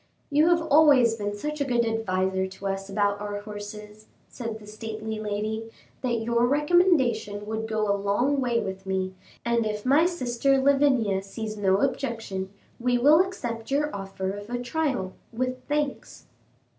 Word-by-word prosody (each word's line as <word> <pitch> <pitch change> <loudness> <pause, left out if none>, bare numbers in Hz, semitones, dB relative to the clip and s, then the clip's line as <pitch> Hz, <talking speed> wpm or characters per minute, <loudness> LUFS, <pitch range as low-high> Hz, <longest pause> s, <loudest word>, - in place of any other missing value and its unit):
"You 300 +3 +4
have 340 -1 +3
always 285 -7 +5
been 205 -1 -3
such 300 +6 -4
a - - +4
good 240 -3 +1
adviser 190 -4 0
to 190 +1 -11
us 195 0 -3
about 205 0 0
our 205 0 -4
horses," 210 0 -9 0.2
said 230 -3 -5
the 215 - -14
stately 220 0 -5
lady, 215 +1 -3 0.3
"that 235 -3 -1
your 235 +1 +2
recommendation 270 - +2
would 220 +1 -3
go 215 -1 0
a 200 - +3
long 205 +8 +1
way 240 -2 +1
with 190 -1 -5
me, 190 0 -1 0.3
and 235 -1 +2
if 210 0 -3
my 290 +6 +5
sister 270 -5 +1
Lavinia 265 -8 +3
sees 215 +2 -6
no 195 -1 +2
objection, 225 -8 -2 0.3
we 245 0 +2
will 300 +8 +6
accept 235 -12 -5
your 295 0 0
offer 195 -1 -4
of 205 +2 -8
a 245 - -2
trial, 245 -6 -2 0.2
with 255 +2 -3
thanks." 295 -1 -3
225 Hz, 160 wpm, -26 LUFS, 205-265 Hz, 0.3 s, will